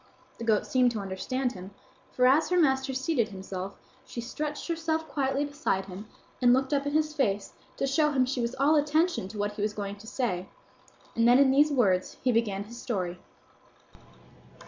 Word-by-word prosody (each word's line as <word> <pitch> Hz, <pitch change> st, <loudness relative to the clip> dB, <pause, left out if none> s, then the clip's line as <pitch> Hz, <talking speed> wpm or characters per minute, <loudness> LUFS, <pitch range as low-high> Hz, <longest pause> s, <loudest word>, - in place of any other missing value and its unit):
The -, -, -5 dB
goat 220 Hz, -2 st, +2 dB
seemed 255 Hz, -1 st, +3 dB
to 220 Hz, -, -3 dB
understand 240 Hz, +7 st, -2 dB
him, 190 Hz, -2 st, -10 dB, 0.4 s
for 250 Hz, -, +2 dB
as 275 Hz, +5 st, +4 dB
her 360 Hz, -, +2 dB
master 265 Hz, -3 st, +2 dB
seated 265 Hz, -2 st, 0 dB
himself, 190 Hz, -1 st, -6 dB, 0.3 s
she -, -, -8 dB
stretched 295 Hz, +5 st, -4 dB
herself 320 Hz, -1 st, -1 dB
quietly 275 Hz, -1 st, 0 dB
beside 285 Hz, -10 st, -1 dB
him 195 Hz, +3 st, -9 dB, 0.3 s
and 245 Hz, -1 st, +6 dB
looked 265 Hz, +2 st, +1 dB
up 280 Hz, 0 st, +1 dB
in 285 Hz, -, -2 dB
his 305 Hz, 0 st, +1 dB
face 205 Hz, -9 st, -1 dB, 0.2 s
to -, -, 0 dB
show 300 Hz, +3 st, +2 dB
him 260 Hz, -3 st, +2 dB
she 255 Hz, -1 st, -2 dB
was 235 Hz, +1 st, -2 dB
all 285 Hz, +4 st, +3 dB
attention 310 Hz, -, +1 dB
to 210 Hz, +2 st, -9 dB
what 205 Hz, 0 st, -1 dB
he 205 Hz, 0 st, -7 dB
was 210 Hz, 0 st, 0 dB
going 200 Hz, -1 st, -5 dB
to 215 Hz, +2 st, -13 dB
say, 200 Hz, -8 st, -2 dB, 0.7 s
and 230 Hz, 0 st, +3 dB
then 245 Hz, +1 st, +7 dB
in 275 Hz, -1 st, +5 dB
these 290 Hz, +3 st, +5 dB
words 195 Hz, -9 st, +1 dB
he 255 Hz, -, +3 dB
began 210 Hz, -4 st, 0 dB
his 235 Hz, +3 st, -10 dB
story. 180 Hz, -7 st, -3 dB
250 Hz, 190 wpm, -28 LUFS, 205-285 Hz, 0.7 s, then